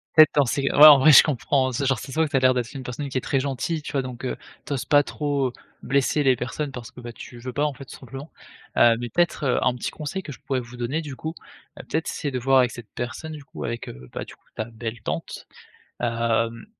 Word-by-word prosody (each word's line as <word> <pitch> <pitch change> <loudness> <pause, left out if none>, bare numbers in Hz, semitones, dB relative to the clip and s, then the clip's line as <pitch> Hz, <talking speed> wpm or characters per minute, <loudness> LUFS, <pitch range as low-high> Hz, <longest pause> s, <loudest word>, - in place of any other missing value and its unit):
Fait 155 -1 +9
en 140 - +5
c'est 135 +3 -1
ouais 150 +1 +11
en 145 -3 +10
vrai 150 +2 +7
je - - +10
comprends. 135 -2 0
C'est 135 +3 -2
genre 135 -1 +2
ça 130 - -8
ce - - -7
voit 160 +1 +2
que 150 - -7
ça 135 - +3
l'air 130 0 +4
d'être 125 +1 -3
une 135 - -7
personne 130 +3 -5
qui 130 - -3
est - - 0
très 135 - 0
gentille, 140 +4 -2
tu 145 - -8
vois? 135 - +1
Donc, 125 0 -7
heu, - - -2 0.3
tu 145 - -3
oses 130 - -2
pas 145 +2 +4
trop, 145 -3 -1
heu, - - -14 0.3
blesser 140 +2 +1
les 130 -2 +4
personnes 135 +4 -4
parce 125 -1 -8
que, 125 - -13
bah 120 -1 -8
tu 120 - -11
veux 125 +1 -6
pas 145 - 0
en 150 -2 0
fait 135 +1 -11
tout - - -11
simplement. 135 +4 -9 0.5
Heu, 115 -1 +6
mais 120 - -4
peut-être, 175 -4 0
heu, 125 - +1
un 125 - +3
petit 125 - -4
conseil 155 +6 -5
que 145 - -8
je 125 - -14
pourrais 130 -2 -1
vous 120 0 -10
donner 125 +7 -2
du 145 -4 -7
coup. 160 +4 -5 0.5
Heu, - - -8
peut-être 160 +1 -1
c'est 145 - -3
de 130 - -2
voir 135 +2 +3
avec 125 -1 +3
cette 120 -3 -10
personne 135 +6 -5
du 150 -2 -9
coup - - -8
avec, 115 0 -4
heu, 60 0 -10
bah - - -5
du - - -13
coup - - -40
ta 110 - -3
belle 115 -1 -7
tante. 80 -2 -5 0.5
Hem, 115 -1 -1
130 Hz, 280 wpm, -24 LUFS, 120-145 Hz, 0.5 s, ouais